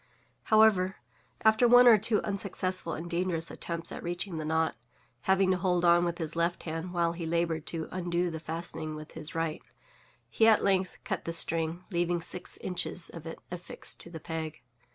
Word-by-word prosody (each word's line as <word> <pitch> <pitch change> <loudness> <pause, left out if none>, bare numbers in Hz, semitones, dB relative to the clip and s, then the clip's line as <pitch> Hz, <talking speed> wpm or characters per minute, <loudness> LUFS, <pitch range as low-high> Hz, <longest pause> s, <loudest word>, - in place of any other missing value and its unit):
However, 215 -4 +4 0.5
after 220 +2 +5
one 245 +1 +8
or 225 -3 +8
two 215 +1 +2
unsuccessful 185 -3 -2
and 165 +2 -5
dangerous 170 -1 -1
attempts 170 -1 -2
at - - -6
reaching 175 0 -4
the 155 - -4
knot 160 +1 +1 0.5
(having 190 0 +3
to 185 - +2
hold 180 -1 +1
on 175 0 +6
with 170 -1 -2
his 160 -2 -4
left 170 +1 0
hand 165 +2 -4
while 170 -1 +1
he 170 -1 -5
labored 165 -1 -1
to 160 -2 -3
undo 175 -1 -1
the 160 - -5
fastening 160 -1 -5
with 155 0 -9
his 160 0 -7
right), 165 -1 -2 0.7
he 225 - +3
at 220 - +5
length 190 -2 +1
cut - - -3
the 165 - -3
string, 165 +1 0
leaving 175 0 +1
six 175 +2 -4
inches 180 -1 -2
of 165 -1 -9
it 165 - -7
affixed 180 0 -3
to - - -3
the 165 -1 -8
peg. 160 -2 -5
170 Hz, 185 wpm, -30 LUFS, 165-185 Hz, 0.7 s, one